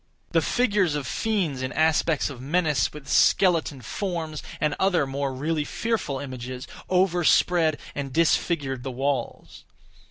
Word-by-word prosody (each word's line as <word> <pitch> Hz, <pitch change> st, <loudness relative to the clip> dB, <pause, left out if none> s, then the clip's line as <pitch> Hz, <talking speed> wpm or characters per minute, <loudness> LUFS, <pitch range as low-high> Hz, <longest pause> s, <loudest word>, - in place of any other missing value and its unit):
The -, -, +3 dB
figures 205 Hz, -, +1 dB
of 145 Hz, -2 st, -3 dB
fiends 180 Hz, -, -1 dB
in 130 Hz, -1 st, -3 dB
aspects 160 Hz, -1 st, +2 dB
of 125 Hz, -3 st, -9 dB
menace, 150 Hz, -1 st, +1 dB
with 150 Hz, -2 st, -11 dB
skeleton 165 Hz, -7 st, +3 dB
forms, 165 Hz, -, -4 dB, 0.2 s
and 150 Hz, -1 st, +1 dB
other 185 Hz, -6 st, +2 dB
more 135 Hz, 0 st, -2 dB
really 150 Hz, +4 st, -1 dB
fearful 220 Hz, -6 st, -2 dB
images, 130 Hz, -1 st, -6 dB, 0.2 s
overspread 175 Hz, -3 st, +3 dB, 0.2 s
and 140 Hz, -1 st, -4 dB
disfigured 150 Hz, -3 st, +1 dB
the 135 Hz, -, -5 dB
walls. 130 Hz, -1 st, -3 dB
150 Hz, 130 wpm, -25 LUFS, 135-175 Hz, 0.2 s, The